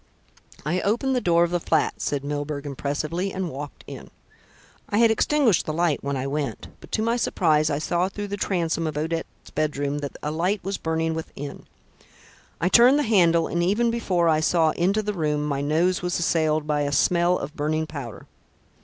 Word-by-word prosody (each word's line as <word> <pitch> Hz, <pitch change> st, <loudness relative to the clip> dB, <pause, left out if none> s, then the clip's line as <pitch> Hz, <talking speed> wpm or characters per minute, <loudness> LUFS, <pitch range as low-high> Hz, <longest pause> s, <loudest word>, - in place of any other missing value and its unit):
"I 175 Hz, +4 st, 0 dB
opened 240 Hz, +6 st, 0 dB
the 250 Hz, -, +1 dB
door 170 Hz, -3 st, +3 dB
of 175 Hz, -, 0 dB
the 175 Hz, -, +1 dB
flat," -, -, 0 dB
said 140 Hz, -1 st, -2 dB
Mr. -, -, -6 dB
Milburgh 145 Hz, 0 st, -3 dB
impressively, 150 Hz, +7 st, -3 dB
"and 185 Hz, -3 st, -3 dB
walked 140 Hz, +2 st, -8 dB
in. -, -, -9 dB, 0.8 s
I 205 Hz, -, 0 dB
had 230 Hz, 0 st, +5 dB
extinguished 230 Hz, -, +2 dB
the 155 Hz, -, -1 dB
light 165 Hz, -2 st, 0 dB
when 140 Hz, 0 st, -2 dB
I 130 Hz, -, -3 dB
went, 140 Hz, 0 st, -3 dB
but -, -, -15 dB
to 220 Hz, -, +1 dB
my 230 Hz, +2 st, +1 dB
surprise 155 Hz, -9 st, +2 dB
I 145 Hz, -, 0 dB
saw 175 Hz, +4 st, 0 dB
through 205 Hz, +1 st, -6 dB
the 200 Hz, -, -2 dB
transom 170 Hz, -4 st, -1 dB
of 150 Hz, -1 st, -4 dB
Odette's 165 Hz, +2 st, -4 dB
bedroom 145 Hz, -1 st, -1 dB
that 145 Hz, -1 st, -6 dB
a 150 Hz, -, -1 dB
light 180 Hz, +5 st, -1 dB
was 195 Hz, +1 st, -3 dB
burning 160 Hz, 0 st, -1 dB
within. 145 Hz, -3 st, -7 dB, 0.9 s
I 170 Hz, -, +1 dB
turned 245 Hz, +8 st, +6 dB
the 295 Hz, -, +2 dB
handle, 170 Hz, -8 st, +4 dB
and 170 Hz, -, -1 dB
even 210 Hz, +7 st, +2 dB
before 185 Hz, -7 st, 0 dB
I 155 Hz, -1 st, +3 dB
saw 160 Hz, 0 st, +3 dB
into 195 Hz, +6 st, +1 dB
the 210 Hz, 0 st, -2 dB
room, 150 Hz, -4 st, -1 dB
my 140 Hz, -2 st, -1 dB
nose 165 Hz, +5 st, +1 dB
was 180 Hz, 0 st, -1 dB
assailed 155 Hz, -3 st, +1 dB
by 150 Hz, -1 st, 0 dB
a 145 Hz, 0 st, -1 dB
smell 175 Hz, +4 st, +3 dB
of 150 Hz, +3 st, -6 dB
burning 155 Hz, +1 st, -1 dB
powder. 140 Hz, -8 st, -8 dB
165 Hz, 200 wpm, -24 LUFS, 150-185 Hz, 0.9 s, turned